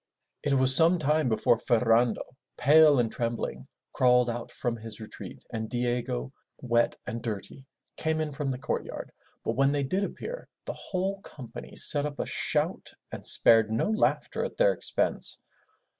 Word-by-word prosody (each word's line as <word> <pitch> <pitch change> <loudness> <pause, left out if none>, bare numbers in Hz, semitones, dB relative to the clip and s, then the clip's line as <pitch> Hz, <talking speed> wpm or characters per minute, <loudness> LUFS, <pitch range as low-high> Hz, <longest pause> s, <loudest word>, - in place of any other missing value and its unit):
It 145 - 0
was 130 0 +6
some 165 +4 +5
time 150 -2 +1
before 115 +1 +2
Ferrando, 120 -1 +2 0.3
pale 150 +3 +6
and 115 -2 0
trembling, 115 -1 -4 0.3
crawled 125 -1 +3
out 120 0 -6
from 120 -1 -3
his 110 -1 -9
retreat, 110 - -10
and 110 -1 -4
Diego, 120 - -2 0.2
wet 120 -1 +1
and 115 - -5
dirty, 115 +4 -6 0.3
came 160 0 -1
in 155 -1 -2
from 140 0 -3
the 130 - -2
courtyard, 130 - -5 0.3
but 115 - 0
when 135 +2 +3
they 145 -1 0
did 185 +9 -1
appear, - - -6 0.2
the - - -4
whole 195 +1 -4
company 130 - -10
set 145 -1 +4
up 145 -1 -8
a - - -2
shout - - -1 0.2
and - - -7
spared 115 -1 +6
no 115 - 0
laughter 220 - 0
at - - -6
their - - +4
expense. - - -1
125 Hz, 160 wpm, -27 LUFS, 115-150 Hz, 0.3 s, was